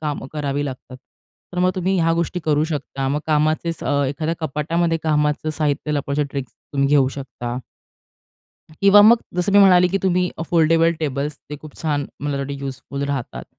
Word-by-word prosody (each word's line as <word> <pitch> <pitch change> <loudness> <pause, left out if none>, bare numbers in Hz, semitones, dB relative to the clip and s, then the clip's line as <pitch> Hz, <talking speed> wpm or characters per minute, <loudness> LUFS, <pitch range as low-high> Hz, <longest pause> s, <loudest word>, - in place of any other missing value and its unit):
कामं 150 -3 -4
करावी 145 -1 -2
लागतात. 130 -2 -7 0.6
तर 180 - -4
मग 180 +1 +3
तुम्ही 185 +1 0
ह्या 165 0 +2
गोष्टी 170 +2 -2
करू 150 -1 +2
शकता. 140 -3 -4
मग 145 +2 -1
कामाचे 155 +2 +1
स 165 - -11
अ, 145 -1 +1
एखाद्या 155 +4 -2
कपाटामध्ये 165 +3 0
कामाचं 150 0 +1
साहित्य 150 0 -1
लपवायच्या 145 0 -1
ट्रिक्स 135 -3 -5 0.2
तुम्ही 140 -1 +1
घेऊ 140 -2 +4
शकता. 125 -3 -6 1.2
किंवा 200 +1 +7
मग 230 +3 +8 0.2
जसं 180 +3 0
मी 205 - +6
म्हणाले 180 -2 +6
की 195 +2 0
तुम्ही 180 -1 +1 0.2
फोल्डेबल 165 0 +4
टेबल्स 145 -1 -2
ते 150 - -4
खूप 155 -2 -12
छान 145 -3 -1
मला 145 0 -2
वाटतं 140 +1 -4
यूजफुल 135 +1 -6
राहतात. 140 -4 -4
150 Hz, 170 wpm, -21 LUFS, 140-170 Hz, 1.2 s, मग